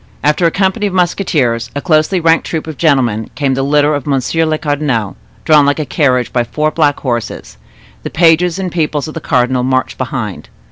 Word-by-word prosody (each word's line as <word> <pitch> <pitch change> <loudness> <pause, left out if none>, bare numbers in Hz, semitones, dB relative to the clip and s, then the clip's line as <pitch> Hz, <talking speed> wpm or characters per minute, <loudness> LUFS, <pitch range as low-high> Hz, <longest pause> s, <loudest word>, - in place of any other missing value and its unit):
After 150 +4 +2
a - - +3
company 190 +3 0
of 195 - -5
musketeers, 155 - 0
a - - -1
closely 155 +4 +1
ranked 165 0 +2
troop 160 -2 -3
of 160 -1 -7
gentlemen, 125 -8 +1
came 140 -2 0
the 135 - -1
litter 145 +2 +2
of 145 -2 -3
monsieur 145 +4 0
le 155 0 0
cardinal, 145 -9 -2 0.3
drawn 150 -2 +5
like 145 0 +1
a 155 - -2
carriage 130 -5 0
by 120 - +2
four 150 +6 -1
black 150 -3 +1
horses. 120 -4 -4 0.4
The - - -5
pages 170 +1 +3
and 185 -2 -3
people 155 -3 -1
of 155 - -7
the 165 - -6
cardinal 125 -1 +1
marched 130 +1 -1
behind. 125 -6 -4
150 Hz, 195 wpm, -14 LUFS, 130-165 Hz, 0.4 s, drawn